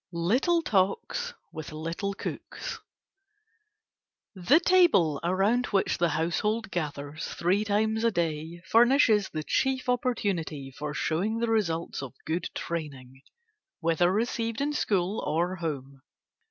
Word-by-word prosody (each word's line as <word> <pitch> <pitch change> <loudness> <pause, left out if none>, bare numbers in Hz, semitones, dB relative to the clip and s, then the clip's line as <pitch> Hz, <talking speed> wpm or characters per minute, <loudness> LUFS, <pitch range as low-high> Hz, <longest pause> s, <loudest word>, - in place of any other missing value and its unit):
LITTLE 255 - +2
TALKS 300 - 0 0.2
WITH 155 -2 -7
LITTLE 165 +6 -3
COOKS - - -6 1.5
The 210 - +4
table 340 - +4
around 195 +8 +2
which 195 -2 +1
the 170 -1 +3
household 195 +8 -1
gathers 150 -2 -4
three 190 +5 +2
times 220 +2 +1
a 230 - +5
day 165 -2 -3
furnishes 230 -2 +4
the 155 -1 -4
chief 265 - 0
opportunity 195 - -1
for 150 0 -5
showing 190 +10 0
the 230 0 0
results 170 -10 0
of 135 -1 -8
good 165 +3 -2
training, 135 -6 -5 0.6
whether 170 +1 +2
received 230 +2 -1
in 290 +1 0
school 200 -6 0
or 175 +4 0
home. 140 -5 -5
185 Hz, 120 wpm, -28 LUFS, 160-225 Hz, 1.5 s, a